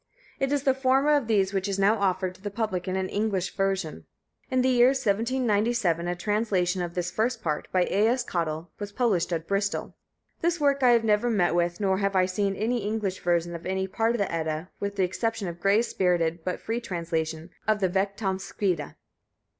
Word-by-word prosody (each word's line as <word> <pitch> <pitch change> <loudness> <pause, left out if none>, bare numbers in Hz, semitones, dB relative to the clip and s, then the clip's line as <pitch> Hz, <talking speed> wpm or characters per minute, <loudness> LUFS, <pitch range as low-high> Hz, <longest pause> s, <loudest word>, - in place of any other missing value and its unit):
It 270 0 0
is 285 -2 +1
the 270 -2 +4
former 265 +2 +2
of 280 -6 0
those 200 -3 +2
which 195 0 0
is 195 -1 -1
now 200 +3 +3
offered 185 -1 0
to 185 - -20
the 205 - -3
public 200 -4 -2
in 185 - -1
an 190 0 -1
English 200 -3 -1
version. 195 -5 -2 0.4
In 255 -2 +2
the 260 - +3
year 245 -1 +6
1797, 225 -6 +1
a 175 - -1
translation 190 -2 0
of 175 0 -4
this 175 -1 -2
first 225 +3 -1
part, 150 -2 -2
by 185 -1 +3
A.S. 225 +7 +2
Cottle, 165 -1 -3
was 205 -1 -5
published 205 -8 +1
at 165 -1 -2
Bristol. 200 0 -1 0.5
This 340 +1 +1
work 280 -1 +2
I 250 - +6
have 230 -1 +3
never 215 +2 +2
met 180 -7 +2
with; 175 0 0
nor 190 -2 +1
have 195 -1 0
I 185 -1 +4
seen 195 +1 -1
any 230 +5 0
English 205 -3 -2
version 175 0 0
of 170 +1 -6
any 190 0 -1
part 225 +4 0
of - - -1
the 200 -3 -1
Edda, 160 +1 -3
with 200 0 -3
the 195 - +1
exception 205 +2 -1
of 170 0 -6
Gray's 200 +6 +2
spirited 170 -3 +1
but 180 - -3
free 230 +2 -3
translation 165 -3 -3 0.2
of 215 -1 +3
the 190 - +2
Vegtamskvida. 190 -3 -2
195 Hz, 200 wpm, -26 LUFS, 180-225 Hz, 0.5 s, year